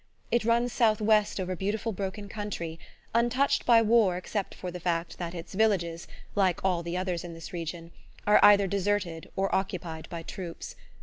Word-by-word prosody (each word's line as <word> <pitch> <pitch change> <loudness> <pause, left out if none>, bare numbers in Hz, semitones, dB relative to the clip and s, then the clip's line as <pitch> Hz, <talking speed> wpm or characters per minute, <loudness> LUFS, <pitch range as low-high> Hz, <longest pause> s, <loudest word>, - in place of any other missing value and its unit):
It 235 - +2
runs 235 +1 +2
southwest 215 -3 +3
over 185 0 -2
beautiful 210 +5 -2
broken 200 +1 -5
country, 200 -6 -5 0.3
untouched 250 +5 +2
by 230 -2 +7
war 215 -5 +4
except 195 +2 -4
for 180 - -6
the 180 - -6
fact 170 -1 -2
that 175 0 -4
its 170 +2 -8
villages, 185 -5 +1 0.3
like 190 -3 +1
all 180 -3 +2
the 170 +1 -3
others 180 -2 -2
in 170 -1 -7
this 165 +2 -9
region, 165 0 -5 0.3
are 210 - +6
either 200 -1 +8
deserted 195 -4 -1
or 195 0 0
occupied 170 -4 -3
by 170 -1 -6
troops. 170 -1 -7
190 Hz, 170 wpm, -28 LUFS, 170-210 Hz, 0.3 s, either